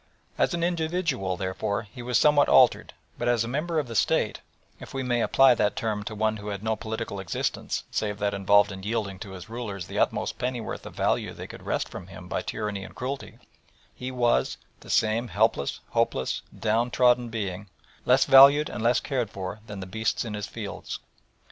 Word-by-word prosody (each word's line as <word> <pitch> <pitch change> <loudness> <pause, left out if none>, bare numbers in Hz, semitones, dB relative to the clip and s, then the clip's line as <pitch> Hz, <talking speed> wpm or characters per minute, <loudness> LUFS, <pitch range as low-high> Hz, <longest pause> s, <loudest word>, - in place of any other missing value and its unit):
As - - +1
an 170 - -2
individual, 160 - -1
therefore, 100 +3 -2
he 115 +4 -11
was 120 -1 +1
somewhat 150 -1 +5
altered, 130 -2 +4 0.2
but 120 - -1
as 120 -2 +3
a - - -4
member 155 +6 -2
of 150 -4 0
the 115 - -6
State 110 - +1 0.4
if - - -10
we 135 - -1
may 120 -2 +1
apply 135 +1 +6
that 105 -3 +1
term 110 -2 -2
to 110 - -5
one 110 +1 0
who 105 0 -9
had 100 -1 -4
no 110 0 +1
political 110 -2 -5
existence 95 - -2
save 105 -1 -1
that 100 0 0
involved 100 +1 +4
in 95 0 -7
yielding 100 -2 -2
to 95 -1 -8
his 95 +3 -9
rulers 110 -5 -5
the - - -4
utmost - - 0
pennyworth 125 -2 -3
of - - -11
value - - 0
they - - -8
could - - -10
wrest - - -1
from 90 - -9
him 95 -2 -11
by - - -2
tyranny 105 -2 -4
and - - -11
cruelty 130 +2 -5 0.6
he 125 - -6
was 120 -2 +1 0.2
the - - -15
same 115 +2 +2
helpless, 70 -7 +1
hopeless, 65 - 0 0.2
downtrodden 120 +2 +2
being, 100 -3 -4 0.3
less 125 +2 +4
valued 140 +3 +8
and - - -5
less 120 +1 +4
cared 125 -6 -2
for 95 +2 -6
than 100 -2 -7
the - - -5
beasts 110 +5 -1
in 110 - -5
his 105 -1 -4
fields. - - -6
110 Hz, 195 wpm, -26 LUFS, 100-125 Hz, 0.6 s, valued